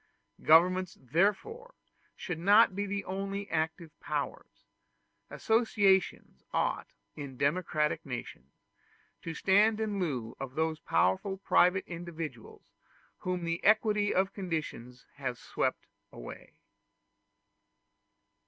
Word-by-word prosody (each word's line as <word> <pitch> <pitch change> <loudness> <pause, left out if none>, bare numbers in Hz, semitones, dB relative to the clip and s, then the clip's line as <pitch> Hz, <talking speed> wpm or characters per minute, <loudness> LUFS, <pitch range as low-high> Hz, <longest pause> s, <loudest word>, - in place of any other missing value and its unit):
Governments 180 +3 +4
therefore 210 - -1 0.4
should 175 -3 -5
not 200 +3 +5
be 200 +1 -2
the 200 0 -3
only 195 +1 -4
active 160 0 -2
powers: - - -5 0.6
associations 210 -4 +1
ought, - - -1 0.3
in 140 -3 -8
democratic 150 +1 0
nations, 120 - -8 0.6
to 165 -1 -6
stand 210 +3 +3
in 210 -2 -2
lieu 125 -10 -3
of 135 -1 -6
those 160 0 -1
powerful 95 - +1
private 190 -1 +3
individuals 170 - -7 0.6
whom 180 -2 -3
the 170 0 -2
equality 210 -1 +3
of 190 +1 +1
conditions 155 - -5
has 130 -4 -3
swept - - -2 0.3
away. - - -10
180 Hz, 100 wpm, -30 LUFS, 155-200 Hz, 0.6 s, not